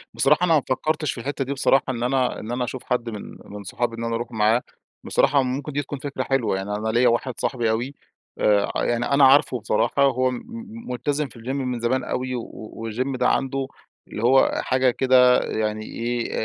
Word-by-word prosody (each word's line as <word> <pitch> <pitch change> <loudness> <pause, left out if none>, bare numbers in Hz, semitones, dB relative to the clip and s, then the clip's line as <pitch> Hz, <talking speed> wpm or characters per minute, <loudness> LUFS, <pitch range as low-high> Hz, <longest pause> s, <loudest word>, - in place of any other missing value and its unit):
بصراحة، 180 - +3
أنا 165 - +3
ما 145 - +3
فكرتش 155 +2 0
في - - -8
الحتة 140 +1 -3
دي 140 - -2
بصراحة، 135 0 +3
إن 120 -2 -2
أنا 130 0 0
إن 110 - -6
أنا 125 +1 -1
أشوف 125 +1 -5
حد 120 -1 -1
من 105 -3 -8
من 105 0 -9
صحابي 115 +5 -2
إن 115 - -4
أنا 115 0 -1
أروح 120 +2 -4
معاه، 110 +2 +2 0.4
بصراحة 140 0 +3
ممكن 135 +4 -3
دي 145 +1 -1
تكون 140 0 -7
فكرة 140 -2 -4
حلوة 135 -7 0
يعني، 100 +2 -3
أنا 110 +1 -3
ليّا 120 +3 +3
واحد 120 +2 0
صاحبي 120 -4 0
أوي 120 +5 -2 0.4
آآ، 105 -1 +3
يعني 120 0 0
أنا 140 0 +3
عارفه 135 -2 +5
بصراحة، 115 +6 +1
هو 130 -1 +2
م 125 - -5 0.5
ملتزم 145 +4 -1
في 120 - -15
الGym 115 - -12
من 130 -3 -2
زمان 125 +3 0
أوي، 130 0 -3
و 120 - -3 0.5
والGym 130 +4 -2
ده 125 - +2
عنده 135 0 -1 0.4
اللي 105 - -6
هو 130 +2 +4
حاجة 130 0 +2
كده 125 0 +5
يعني 110 0 -2
إيه، 120 +1 -3
125 Hz, 205 wpm, -23 LUFS, 115-135 Hz, 0.5 s, عارفه